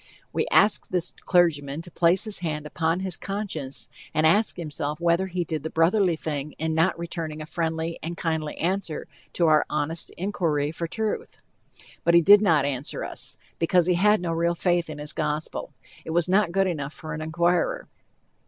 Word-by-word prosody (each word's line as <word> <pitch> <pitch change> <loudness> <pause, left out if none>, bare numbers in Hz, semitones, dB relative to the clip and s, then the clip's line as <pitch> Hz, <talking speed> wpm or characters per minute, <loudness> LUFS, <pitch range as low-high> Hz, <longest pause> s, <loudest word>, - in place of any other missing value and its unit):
We - - 0
ask 210 - +4
this 180 -1 -2
clergyman 160 -4 +2
to 175 - -12
place 170 +3 +3
his 215 -3 -3
hand 155 -3 -3
upon 165 +3 -1
his 185 -2 -1
conscience 195 -9 -4 0.3
and 155 - +3
ask 205 +7 +4
himself 150 -2 -4
whether 170 +2 +2
he 180 -1 -2
did 160 -3 -3
the 160 - -4
brotherly 175 +2 +3
thing 150 -2 -4
in 160 0 -2
not 165 +3 +2
returning 165 -2 -5
a 155 - -6
friendly 165 0 -2
and 170 +1 -5
kindly 160 -2 -2
answer 180 -2 -2 0.3
to 175 - +2
our 155 -2 +5
honest 150 +2 -1
inquiry 165 -6 0
for 165 +1 -4
truth. 220 +5 -3 0.7
But 170 0 +4
he 170 - +8
did 205 +4 +8
not 160 -9 +3
answer 140 0 -2
us, - - -4 0.2
because 170 +1 +3
he 180 - +3
had 210 +3 +4
no 170 -2 -2
real 170 +1 +1
faith 175 -1 +1
in 155 - -6
his 150 0 -5
gospel. 150 0 -3 0.3
It - - -9
was 170 +1 +1
not 190 -1 +3
good 195 +2 +2
enough 150 -5 -3
for 155 -1 -7
an 155 - -5
inquirer. 175 - 0
165 Hz, 185 wpm, -25 LUFS, 155-180 Hz, 0.7 s, he